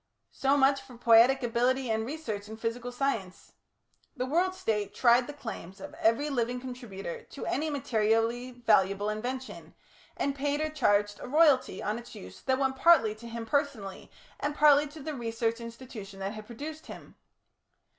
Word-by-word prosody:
So 275 +1 +2
much 275 0 +4
for 265 -3 -14
poietic 240 +3 +5
ability 245 +1 +1
and 220 0 0
research 220 -9 -5
in 220 - -8
physical 235 +2 -3
science. 245 -8 -3 0.7
The 250 - -1
World 355 +7 +1
State 210 - -2
tried 240 0 +4
the - - -5
claims 220 -9 -8
of - - -9
every 230 +7 +3
living 245 -1 -1
contributor 240 -8 -7
to 275 - -8
any 310 +3 -1
materially 230 -2 0
valuable 210 -4 +2
invention, 255 +4 -6 0.4
and 280 - 0
paid 285 +1 -1
or 310 0 -1
charged 205 -8 +1
a - - -7
royalty 290 -1 +3
on 215 +3 -1
its 240 - -12
use 90 0 -11
that 260 0 +1
went 265 -1 0
partly 265 -10 +5
to 235 +2 -11
him 230 0 -5
personally, 235 -8 -2 0.3
and 290 0 -2
partly 295 -1 +6
to 300 +2 -11
the 310 +1 -4
research 230 -2 -2
institution 230 -4 -9
that 195 +2 -3
had 215 -1 -9
produced 305 +7 -8
him. - - -11
245 Hz, 165 wpm, -29 LUFS, 220-275 Hz, 0.7 s, partly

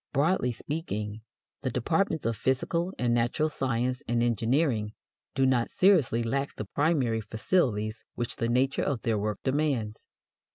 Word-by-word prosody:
Broadly 145 -2 +2
speaking, 110 - -4 0.4
the 130 - -1
departments 160 - 0
of 115 0 +1
physical 170 - 0
and 120 -1 +1
natural 120 +6 +1
science 125 -3 -1
and 120 0 +1
engineering 115 -1 +1 0.4
do 135 - +3
not 125 -3 +2
seriously 160 - +3
lack 135 +4 -2
the 110 - -5
primary 130 - +1
facilities 110 - 0
which 120 -1 -1
the 115 - 0
nature 130 +3 +2
of 135 -5 -1
their 115 -4 +1
work 105 0 -3
demands. 130 -6 -1
125 Hz, 140 wpm, -28 LUFS, 115-145 Hz, 0.4 s, do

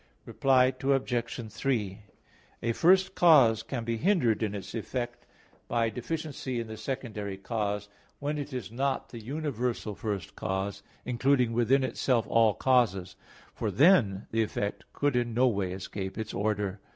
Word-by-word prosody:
Reply 130 -1 +3
Obj. 125 -4 -1
3: 110 -5 -1 0.6
A 115 - +1
first 185 +8 +4
cause 135 - +6
can 120 +1 -4
be 115 0 -2
hindered 140 - +2
in 105 -2 -1
its 100 0 -7
effect 120 +1 -4 0.4
by 115 -1 +1
deficiency 135 0 -4
in 115 - -3
the 110 0 -7
secondary 110 -4 -4
cause, 105 -1 -2 0.3
when 150 +1 -2
it 145 +1 -5
is 125 -4 -5
not 135 +3 -1
the 120 - -8
universal 125 -5 -2
first 100 -4 -4
cause, 95 +1 -3 0.2
including 125 -1 +2
within 120 +4 +3
itself 125 -2 +1
all 115 -2 +4
causes; 105 -8 +2 0.4
for 110 - -2
then 105 - +4
the 115 - +2
effect 105 -1 -3
could 145 -2 0
in 120 -2 0
no 130 +2 +4
way 100 -6 0
escape 95 +1 -5
its 110 - -4
order. 105 -1 -1
115 Hz, 150 wpm, -29 LUFS, 105-130 Hz, 0.6 s, cause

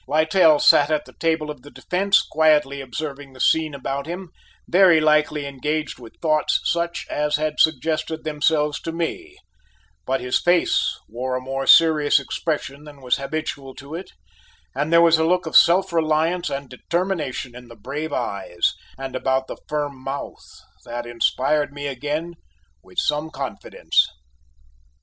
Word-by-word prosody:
Littell 155 +1 +4
sat 145 0 +5
at 150 -1 0
the - - -16
table 160 -2 0
of 145 - -10
the 145 - -13
defence 195 +6 +1
quietly 150 -3 +2
observing 140 +1 -6
the 130 - -15
scene 155 +1 +2
about 140 +1 -4
him, 175 +1 -6 0.4
very 180 -3 +5
likely 150 -1 +2
engaged 150 +3 -3
with 115 -2 -13
thoughts 155 -2 +1
such 170 0 -1
as 150 0 0
had 155 0 -2
suggested 160 +1 +1
themselves 150 -1 0
to 165 - -4
me: 355 - -4 0.7
but 135 +1 0
his 125 0 0
face 175 -1 +2
wore 125 +3 -4
a - - -1
more 135 +1 -4
serious 155 -3 +6
expression 145 0 -4
than 150 -2 -13
was 125 -2 0
habitual 140 -2 -5
to 140 +2 -11
it, 175 +3 -6 0.6
and 145 +4 -2
there 170 0 +6
was 165 -1 +5
a - - +2
look 180 +2 +1
of 160 - -5
self 185 +1 +5
reliance 165 +2 +1
and 140 0 -5
determination 155 -4 -3
in 125 0 -11
the 115 - -13
brave 145 +8 -5
eyes 100 -8 -1 0.2
and 135 -1 -6
about 130 +1 0
the - - -8
firm 145 -2 -2
mouth 135 +1 -6 0.4
that 120 0 -6
inspired 130 +5 0
me 145 0 -7
again 150 +5 -3 0.5
with 90 - -20
some 150 +1 0
confidence. 135 -3 -1
150 Hz, 155 wpm, -22 LUFS, 135-160 Hz, 0.7 s, serious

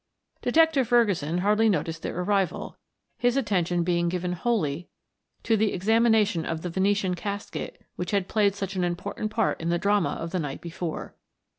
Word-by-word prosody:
Detective 300 -1 +3
Ferguson 200 - +2
hardly 210 +2 +4
noted 175 -4 0
their 165 - -5
arrival, 195 -2 -1 0.4
his 245 +2 +2
attention 180 -8 +1
being 170 0 +1
given 180 0 -2
wholly 175 -6 -1 0.5
to 225 - +3
the 215 -1 +1
examination 215 -2 +3
of 160 -1 -4
the 180 - -3
Venetian 195 0 +1
casket 205 - -5 0.2
which 180 - -3
had 200 -3 0
played 205 -2 +2
such 195 -1 -4
an 185 - 0
important 175 +4 -3
part 225 -4 0
in 165 - -2
the 175 - +2
drama 200 0 +2
of 165 0 -5
the 185 - -1
night 145 -4 -4
before. 170 -1 -5
190 Hz, 165 wpm, -26 LUFS, 175-215 Hz, 0.5 s, hardly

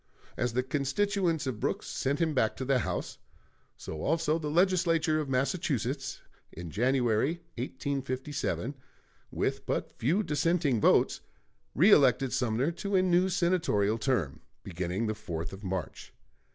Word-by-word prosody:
As 120 -1 -1
the 125 +1 +1
constituents 160 +5 0
of 130 -5 -3
Brooks - - -2
sent 140 +2 -1
him 165 -2 +1
back 110 -5 +1
to 130 - -5
the 135 -1 +2
House, - - -4 0.6
so 80 - -7
also 165 +1 +1
the 150 -2 -3
Legislature 165 -2 +2
of 150 -3 -3
Massachusetts, 135 - -1 0.3
in 85 -1 -8
January, 125 - +1 0.2
1857, 135 0 -3 0.6
with - - -2
but - - -2
few 170 - 0
dissenting 150 - +1
votes, - - +3 0.6
reëlected 135 - +5
Sumner 125 +5 0
to 200 +4 -3
a 185 - +4
new 180 +1 +3
senatorial 170 - +1
term, 100 - -1 0.2
beginning 90 +4 -3
the 110 - -1
4th 85 -6 -5
of 95 +2 -10
March. 95 -5 -5
135 Hz, 135 wpm, -29 LUFS, 115-165 Hz, 0.6 s, reëlected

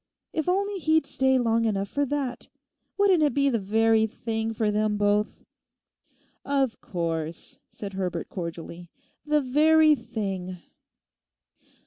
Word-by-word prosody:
If 315 +2 -1
only 400 +2 0
he'd 315 -2 +2
stay 265 -1 +2
long 230 -2 +2
enough 200 -2 0
for 285 +6 -1
that. 275 -3 -3 0.5
Wouldn't 390 -4 +4
it 295 -2 +2
be 280 0 +3
the 235 -4 0
very 220 +2 +3
thing 225 0 -3
for 220 -1 0
them 210 0 0
both!' 205 +1 0 1.0
'Of 270 -5 0
course,' 165 -2 -4
said 200 -2 -7
Herbert 180 -3 -3
cordially, 170 -1 -7 0.4
'the 300 0 +3
very 310 +4 +5
thing. 195 -7 -4
225 Hz, 125 wpm, -26 LUFS, 200-285 Hz, 1.0 s, very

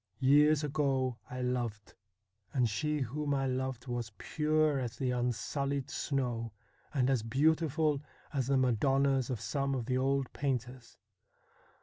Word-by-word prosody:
Years 145 +3 +5
ago 135 -4 0
I 125 0 -4
loved, 120 -4 -2 0.6
and 125 -4 +3
she 150 +8 -1
whom 145 +3 -1
I 135 0 0
loved 130 -1 -2
was 120 -4 -3
pure 155 -2 +1
as 120 -3 -4
the 130 -2 0
unsullied 130 +3 -1
snow 120 -6 -2 0.4
and 130 -4 +2
as 130 -4 +2
beautiful 150 +4 +2 0.3
as 135 -3 0
the 135 0 +3
Madonnas 135 +1 +2
of 125 -4 -2
some 140 +2 -1
of 125 -3 -2
the 130 +1 0
old 135 0 0
painters. 125 -3 -3
130 Hz, 135 wpm, -32 LUFS, 125-140 Hz, 0.6 s, Years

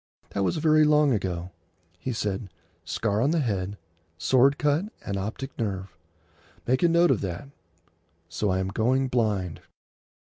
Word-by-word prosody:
That 100 - -1
was 160 - 0
very 155 0 +4
long 150 -1 +4
ago. 90 -4 -2 0.5
He 130 - -3
said, 105 -3 -3 0.3
"Scar 105 -1 -1
on 140 - +3
the 165 +1 +2
head,—sword 100 - 0
cut 150 +5 +1 0.2
and 100 - -2
optic 110 +8 -4
nerve." 95 -5 -3 0.7
Make 130 +2 +1
a 175 - +5
note 170 +1 +4
of - - +1
that. 95 +8 -5 0.8
So 85 +5 -1
I 95 - +1
am 95 0 -1
going 125 +6 +1
blind. 105 -8 0
110 Hz, 145 wpm, -26 LUFS, 95-140 Hz, 0.8 s, a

